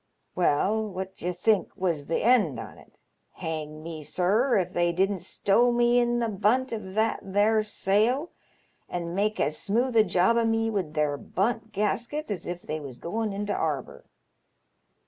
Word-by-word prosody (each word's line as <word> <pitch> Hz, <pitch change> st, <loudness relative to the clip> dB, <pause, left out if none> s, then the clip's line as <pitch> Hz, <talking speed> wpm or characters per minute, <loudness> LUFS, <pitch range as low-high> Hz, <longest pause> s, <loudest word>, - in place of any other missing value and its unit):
Well, 185 Hz, +6 st, +2 dB
what 190 Hz, 0 st, -6 dB
d'ye 180 Hz, -, -2 dB
think 200 Hz, +3 st, +1 dB
was 165 Hz, -6 st, -1 dB
th' 165 Hz, -, 0 dB
end 210 Hz, -, +3 dB
on -, -, -9 dB
it. -, -, -20 dB, 0.4 s
Hang 155 Hz, -1 st, -5 dB
me, 165 Hz, -1 st, -6 dB
sir, 200 Hz, -, +2 dB
if 180 Hz, -1 st, -1 dB
they 175 Hz, 0 st, +2 dB
didn't 190 Hz, +2 st, +1 dB
stow 205 Hz, +6 st, +2 dB
me 240 Hz, 0 st, +3 dB
in 240 Hz, 0 st, +1 dB
th* 220 Hz, -5 st, -3 dB
bunt 255 Hz, +6 st, +2 dB
of 200 Hz, -4 st, -6 dB
that 220 Hz, +1 st, +1 dB
there 205 Hz, +3 st, +2 dB
sail, 215 Hz, -, +1 dB, 0.6 s
and 170 Hz, -1 st, -4 dB
make 210 Hz, +3 st, 0 dB
as 150 Hz, +1 st, 0 dB
smooth 240 Hz, +4 st, 0 dB
a 220 Hz, -, +7 dB
job 190 Hz, +3 st, +2 dB
o' 235 Hz, -, +3 dB
me 225 Hz, 0 st, +1 dB
wid 180 Hz, -7 st, -3 dB
their 150 Hz, -1 st, +1 dB
bunt 220 Hz, +7 st, -2 dB
gaskets 230 Hz, +7 st, -2 dB
as 195 Hz, -, -4 dB
if 175 Hz, 0 st, -5 dB
they 155 Hz, -, -4 dB
was 135 Hz, -5 st, -9 dB
goin' 215 Hz, -, -3 dB
into 205 Hz, +1 st, -2 dB
'arbour. 145 Hz, -5 st, -3 dB
200 Hz, 170 wpm, -27 LUFS, 175-225 Hz, 0.6 s, a